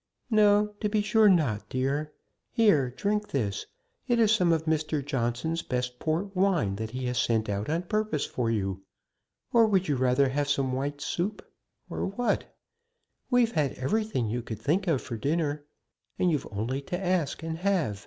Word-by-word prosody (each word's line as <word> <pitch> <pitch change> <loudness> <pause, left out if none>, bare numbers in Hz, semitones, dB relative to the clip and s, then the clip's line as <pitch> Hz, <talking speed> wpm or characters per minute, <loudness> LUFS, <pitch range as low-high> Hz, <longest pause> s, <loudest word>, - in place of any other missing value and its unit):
"No; 210 -1 +4
to 210 - 0
be 210 0 +1
sure 215 0 +5
not, 145 - +1
dear. 140 +4 -1 0.4
Here, 160 - +3
drink 210 +10 -1
this; 105 -8 -2 0.4
it 240 -2 +2
is 220 -2 +4
some 180 -5 +3
of 160 -1 +1
Mr. 155 -2 0
Johnson's 140 +4 -1
best 125 -1 -3
port 175 +5 -2
wine 175 - +2
that 110 +1 -4
he 130 +2 -4
has 125 -1 -1
sent 110 -2 +1
out 100 +3 -2
on 165 +3 0
purpose 210 -5 -1
for 120 -3 -2
you. 95 -4 -1 0.7
Or 230 -2 +6
would 190 -3 +2
you 145 - +1
rather 130 +2 +3
have 145 +2 -1
some 135 -2 +1
white 145 +2 -3
soup 190 +8 -3 0.4
or - - -3
what? 230 +5 0 0.8
We've 245 -2 +3
had 150 - 0
everything 205 - -1
you 120 +3 -2
could 110 -2 -7
think 185 +7 0
of 155 -7 +1
for 115 - -5
dinner, 145 +3 -1 0.5
and 180 - +2
you've 150 - -1
only 115 +7 -2
to 175 +6 -4
ask 180 -5 -1
and 165 0 -4
have. 175 - 0
150 Hz, 175 wpm, -28 LUFS, 125-195 Hz, 0.8 s, Or